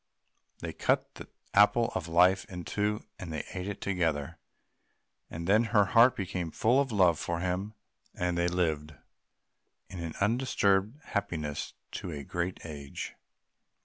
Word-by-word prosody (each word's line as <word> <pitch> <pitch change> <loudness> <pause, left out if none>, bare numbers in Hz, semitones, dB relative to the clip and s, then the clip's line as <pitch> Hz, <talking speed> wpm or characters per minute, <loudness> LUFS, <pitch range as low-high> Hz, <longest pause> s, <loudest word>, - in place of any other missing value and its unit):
They - - -4
cut - - 0
the - - -10 0.3
Apple 105 +3 +5
of 85 - -3
Life 90 +3 +4
in 90 -2 -8
two 105 0 -1
and 90 -3 -6
ate 90 +5 -5
it 100 - -5
together; 80 -5 -1 0.9
and 85 +1 -6
then 110 +5 +4
her 105 -3 +4
heart 115 +5 +6
became 90 -3 -3
full 120 - +3
of 135 -3 -2
love 90 -6 +4
for 85 0 -2
him, 95 +4 -2 0.4
and 90 0 -1
they 85 0 +2
lived 80 -4 -1 0.9
in 85 -3 -6
undisturbed 105 0 +2
happiness 80 -9 -3 0.2
to - - -5
a 75 -4 -5
great 85 +5 -3
age. 70 -4 -6
90 Hz, 140 wpm, -30 LUFS, 85-105 Hz, 0.9 s, heart